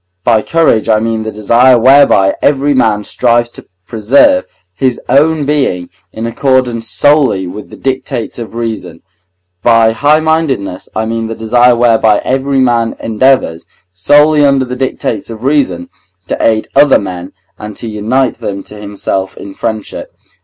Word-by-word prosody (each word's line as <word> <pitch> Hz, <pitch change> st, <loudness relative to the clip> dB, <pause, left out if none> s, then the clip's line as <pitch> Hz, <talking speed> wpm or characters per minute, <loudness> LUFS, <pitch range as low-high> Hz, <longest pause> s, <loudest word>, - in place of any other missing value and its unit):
By 110 Hz, +1 st, +2 dB
courage 155 Hz, -7 st, +1 dB
I 110 Hz, -1 st, +3 dB
mean 115 Hz, 0 st, -2 dB
the 110 Hz, 0 st, -5 dB
desire 120 Hz, +4 st, +3 dB
whereby 130 Hz, -6 st, +4 dB
every 145 Hz, 0 st, +1 dB
man 110 Hz, -5 st, +1 dB
strives 120 Hz, +1 st, 0 dB
to -, -, -14 dB, 0.2 s
preserve 140 Hz, -, +2 dB, 0.3 s
his 130 Hz, +6 st, -1 dB
own 150 Hz, +1 st, +2 dB
being 135 Hz, -12 st, -1 dB, 0.2 s
in 110 Hz, -, -6 dB
accordance 120 Hz, -1 st, -1 dB
solely 145 Hz, -10 st, +2 dB
with 100 Hz, +4 st, -9 dB
the -, -, -12 dB
dictates 130 Hz, -3 st, -4 dB
of 115 Hz, -1 st, -8 dB
reason. 115 Hz, -8 st, -5 dB, 0.6 s
By 115 Hz, -1 st, +3 dB
highmindedness 150 Hz, -, 0 dB
I 110 Hz, -, -1 dB
mean 115 Hz, 0 st, -3 dB
the 115 Hz, -, -6 dB
desire 120 Hz, +2 st, +2 dB
whereby 115 Hz, -3 st, +3 dB
every 135 Hz, +1 st, 0 dB
man 120 Hz, -3 st, +1 dB
endeavours, 115 Hz, -7 st, 0 dB, 0.2 s
solely 145 Hz, +11 st, +3 dB
under 140 Hz, -2 st, +2 dB
the 125 Hz, 0 st, -6 dB
dictates 125 Hz, -5 st, -3 dB
of 115 Hz, 0 st, -9 dB
reason, 130 Hz, -, 0 dB, 0.4 s
to -, -, -3 dB
aid 110 Hz, -1 st, +1 dB
other 145 Hz, +1 st, +5 dB
men 90 Hz, -3 st, -7 dB, 0.3 s
and 105 Hz, -1 st, -8 dB
to 115 Hz, -, -7 dB
unite 115 Hz, +5 st, -1 dB
them 100 Hz, -1 st, -5 dB
to 105 Hz, -, -13 dB
himself 100 Hz, -2 st, -4 dB
in 100 Hz, -, -9 dB
friendship. 110 Hz, 0 st, -6 dB
115 Hz, 150 wpm, -11 LUFS, 110-135 Hz, 0.6 s, other